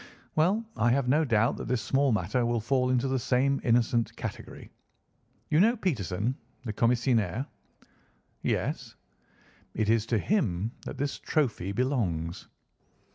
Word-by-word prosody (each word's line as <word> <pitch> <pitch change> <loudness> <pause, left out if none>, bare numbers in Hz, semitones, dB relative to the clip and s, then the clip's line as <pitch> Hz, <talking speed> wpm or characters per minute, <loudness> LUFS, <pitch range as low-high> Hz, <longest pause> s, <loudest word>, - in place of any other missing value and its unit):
Well, 190 +9 +2
I 120 - +2
have 125 +1 +2
no 150 +5 +3
doubt 115 -5 +2
that - - -6
this 125 -1 +1
small 135 0 +2
matter 105 +4 0
will 120 0 +1
fall 125 +3 +1
into 130 +1 +1
the 130 0 0
same 135 +2 +1
innocent 120 -1 +2
category. - - -7 0.8
You 150 - +4
know 230 +6 +4
Peterson, 115 - -1 0.3
the 110 -4 -4
commissionaire?" 115 -1 +1 1.0
"Yes." - - -2 0.8
"It 110 -1 0
is 115 -1 +1
to 115 - +1
him 110 - 0
that - - -6
this 140 +1 -2
trophy 115 - -1
belongs." 100 - -1
125 Hz, 135 wpm, -28 LUFS, 110-140 Hz, 1.0 s, You